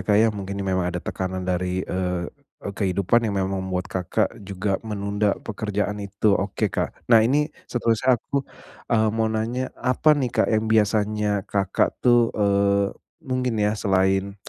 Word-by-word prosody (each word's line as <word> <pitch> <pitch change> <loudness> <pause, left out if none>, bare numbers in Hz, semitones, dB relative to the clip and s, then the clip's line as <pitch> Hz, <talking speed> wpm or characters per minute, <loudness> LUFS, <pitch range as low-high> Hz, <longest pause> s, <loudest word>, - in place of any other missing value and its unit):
Kak 105 - +4
ya, 110 +2 +5
mungkin 100 -1 -5
memang 95 -2 0
ada 90 - -3
tekanan 95 0 -4
dari, 90 0 -1
eee, 90 -1 -2 0.4
kehidupan 100 +3 0
yang 100 - -2
memang 95 0 -1
membuat 90 -1 -2
Kakak 90 -2 0
juga 100 0 -2
menunda 100 -1 -1
pekerjaan 105 -1 -3
itu. 100 +1 +1
Oke 100 0 -1
Kak, - - -1 0.2
nah 115 -2 +8
ini 145 +7 +2 0.2
seterusnya 120 +1 +2
aku, 140 +4 -2 0.5
eee, 110 -1 +3
mau 110 0 +1
nanya 115 +4 -2
apa 130 +4 +2
nih 130 -4 -1
Kak - - +2
yang 110 0 +2
biasanya 105 -1 +2 0.2
Kakak 95 -2 0
tuh 120 -2 +4
eee, 100 -1 +2 0.3
mungkin 130 -5 -1
ya 105 +1 +1
selain 95 0 +1
100 Hz, 155 wpm, -23 LUFS, 95-110 Hz, 0.5 s, nah